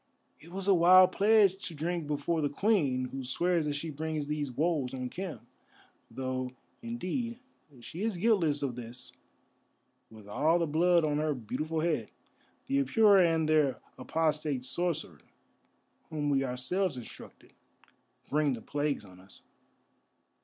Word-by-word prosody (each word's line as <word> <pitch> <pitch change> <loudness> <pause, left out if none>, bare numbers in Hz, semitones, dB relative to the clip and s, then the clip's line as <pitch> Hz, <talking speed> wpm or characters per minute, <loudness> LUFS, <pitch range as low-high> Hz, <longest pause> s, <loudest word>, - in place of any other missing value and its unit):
"It 165 - -15
was 195 +1 -4
a 200 - +6
wild 185 +1 +7
pledge 200 -2 +3
to 165 - -8
drink 165 +1 -3
before 150 +3 -1
the 145 - 0
Queen, 140 - +1
who 135 0 -5
swears 165 +5 +1
that 145 - -1
she 155 +2 -4
brings 155 0 -3
these 145 -2 -3
woes 145 -1 -1
on 125 -1 -5
Khem. 185 -3 -6 0.7
Though, 130 -1 -4 0.3
indeed, 235 +1 -4 0.4
she 165 +9 -8
is 220 -3 -1
guiltless 170 -8 +2
of 130 -4 -2
this, 120 0 -9 1.0
with 110 -2 -14
all 155 +11 +2
the 170 - +1
blood 170 +2 +3
on 150 -1 0
her 155 -1 0
beautiful 150 +7 -3
head. 155 -9 -1 0.6
The 140 0 +1
Apura 200 - +5
and 160 -1 +1
their 150 -4 +2 0.2
apostate 150 -1 -1
sorcerer, 160 - -3 0.9
whom 145 -2 -1
we 135 -1 +2
ourselves 135 +6 -1
instructed, 120 - -12 0.7
bring 150 -1 +1
the 115 - -6
plagues 145 -6 -2
on 90 -1 -15
us." 95 +1 -15
155 Hz, 145 wpm, -30 LUFS, 135-175 Hz, 1.0 s, wild